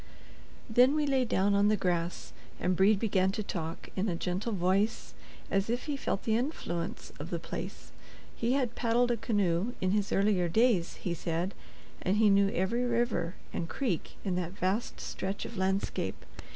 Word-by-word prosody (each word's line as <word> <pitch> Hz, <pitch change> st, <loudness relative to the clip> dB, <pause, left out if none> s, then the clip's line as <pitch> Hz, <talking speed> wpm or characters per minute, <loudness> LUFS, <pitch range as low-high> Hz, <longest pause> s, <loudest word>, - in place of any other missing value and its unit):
Then 250 Hz, +5 st, +5 dB
we 305 Hz, -1 st, +2 dB
lay 265 Hz, -3 st, +2 dB
down 200 Hz, -2 st, +2 dB
on 200 Hz, +1 st, +4 dB
the 215 Hz, 0 st, +3 dB
grass, 175 Hz, -2 st, -1 dB, 0.3 s
and 180 Hz, +1 st, +1 dB
Brede 195 Hz, +3 st, +5 dB
began 190 Hz, -3 st, +2 dB
to 215 Hz, -, -2 dB
talk, 165 Hz, -4 st, -5 dB
in 200 Hz, +2 st, 0 dB
a 175 Hz, -, 0 dB
gentle 180 Hz, +7 st, -2 dB
voice, 195 Hz, +3 st, +1 dB, 0.4 s
as 195 Hz, +2 st, +1 dB
if 240 Hz, +2 st, 0 dB
he 295 Hz, -2 st, -2 dB
felt 235 Hz, -7 st, -2 dB
the 220 Hz, -, +2 dB
influence 220 Hz, -, -3 dB
of -, -, -6 dB
the -, -, -1 dB
place. -, -, -7 dB, 0.4 s
He 235 Hz, +2 st, +1 dB
had 255 Hz, -4 st, +1 dB
paddled 240 Hz, +1 st, +2 dB
a -, -, +3 dB
canoe, 205 Hz, -1 st, +1 dB
in 185 Hz, -, +1 dB
his 205 Hz, 0 st, +1 dB
earlier 195 Hz, -3 st, +3 dB
days, 220 Hz, -2 st, +3 dB
he 175 Hz, -, -3 dB
said, 170 Hz, +3 st, -2 dB, 0.5 s
and 190 Hz, +3 st, +1 dB
he 215 Hz, -1 st, +5 dB
knew 200 Hz, 0 st, +5 dB
every 200 Hz, +7 st, 0 dB
river 235 Hz, -7 st, 0 dB, 0.2 s
and 165 Hz, -, -3 dB
creek 235 Hz, -, -2 dB
in 185 Hz, -2 st, 0 dB
that 175 Hz, 0 st, -3 dB
vast 195 Hz, +5 st, -1 dB
stretch 195 Hz, +1 st, -4 dB
of 235 Hz, -, -7 dB
landscape. 190 Hz, 0 st, -1 dB
200 Hz, 180 wpm, -30 LUFS, 185-235 Hz, 0.5 s, Then